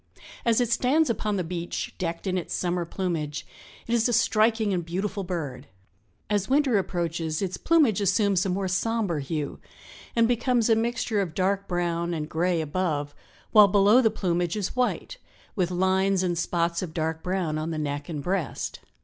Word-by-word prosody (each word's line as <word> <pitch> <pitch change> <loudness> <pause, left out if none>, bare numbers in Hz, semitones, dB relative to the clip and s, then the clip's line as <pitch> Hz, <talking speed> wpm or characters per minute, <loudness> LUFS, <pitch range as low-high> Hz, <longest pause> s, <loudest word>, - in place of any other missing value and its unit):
As 230 -1 +3
it 240 -2 +1
stands 265 +4 +3
upon 210 -2 -1
the 185 - -1
beach, 175 0 -4
decked 170 0 -3
in 185 -1 0
its 180 - -3
summer 175 -1 -1
plumage, 165 -4 -3 0.4
it 235 - -2
is 235 +1 +3
a - - 0
striking 220 -1 +3
and 175 -2 -1
beautiful 195 +4 -3
bird. 150 -8 -5 0.6
As 205 0 0
winter 270 -5 +3
approaches 165 -4 -2
its 190 -2 -2
plumage 290 - +3
assumes 200 -1 +2
a 195 - -1
more 190 +1 -1
somber 190 -2 0
hue 145 +1 -4 0.6
and 230 -1 +4
becomes 240 -1 +2
a - - +6
mixture 225 -2 0
of 170 -5 -4
dark 195 +1 0
brown 170 -1 -1
and 155 -1 -3
gray 170 +1 0
above, 150 -2 -2 0.4
while 210 -2 +8
below 205 +5 +5
the 225 - +4
plumage 175 -4 -1
is 200 -2 -3
white 250 - -1 0.4
with 180 -3 +1
lines 190 +1 +2
and 175 -1 0
spots 170 0 0
of 175 -4 -6
dark 160 -1 -2
brown 180 -4 -1
on 155 +1 -3
the 160 - -3
neck 145 0 -3
and 150 -4 -4
breast. 180 -3 -2
185 Hz, 175 wpm, -26 LUFS, 170-215 Hz, 0.6 s, while